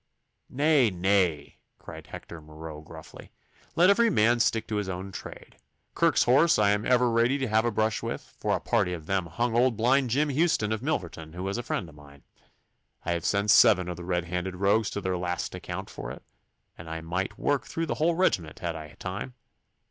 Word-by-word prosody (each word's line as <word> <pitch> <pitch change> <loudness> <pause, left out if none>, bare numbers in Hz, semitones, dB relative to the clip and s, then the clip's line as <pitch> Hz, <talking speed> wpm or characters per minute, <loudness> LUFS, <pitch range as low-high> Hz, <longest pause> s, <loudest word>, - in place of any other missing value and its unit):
'Nay, 145 -3 +3
nay!' 90 -5 0 0.2
cried - - -11
Hector 85 -2 -10
Marot 75 0 -10
gruffly. 80 -1 -12 0.4
'Let 175 +3 +6
every 230 +3 +4
man 120 - +3
stick 115 -1 +1
to 105 - -2
his 100 -2 -2
own 95 +1 -5
trade. - - -10 0.4
Kirke's 165 -4 +3
Horse 140 +7 +4
I 105 -1 +4
am 105 +1 0
ever 125 -1 +3
ready 120 +4 +2
to 135 - -1
have 110 +1 +2
a 120 - +1
brush 110 0 0
with, - - -6
for - - 0
a - - -2
party 90 - 0
of 80 -3 -7
them 95 0 -1
hung 115 +8 -1
old 120 -1 +3
blind 125 +3 +2
Jim 145 +6 +1
Houston 145 -7 +1
of 110 0 -2
Milverton, 85 - -4
who 90 +1 -6
was 100 +4 -2
a - - -1
friend 105 -6 -3
of 80 - -14
mine. 70 -1 -16 0.8
I 85 - -1
have 85 -1 -2
sent 100 0 +2
seven 100 -7 +6
of 90 - -4
the 90 - -9
red 90 -1 -1
handed 90 +2 -3
rogues 100 +3 +2
to 100 - -4
their 95 -1 -1
last 90 0 -3
account - - -6
for - - -8
it, 60 - -9 0.5
and 80 0 -7
might 90 +3 -2
work 140 -5 0
through 165 - -3
the - - -2
whole 170 +1 +3
regiment 90 - 0
had 85 -2 -4
I 75 -1 -9
time. 105 +7 -6
100 Hz, 205 wpm, -27 LUFS, 85-125 Hz, 0.8 s, Let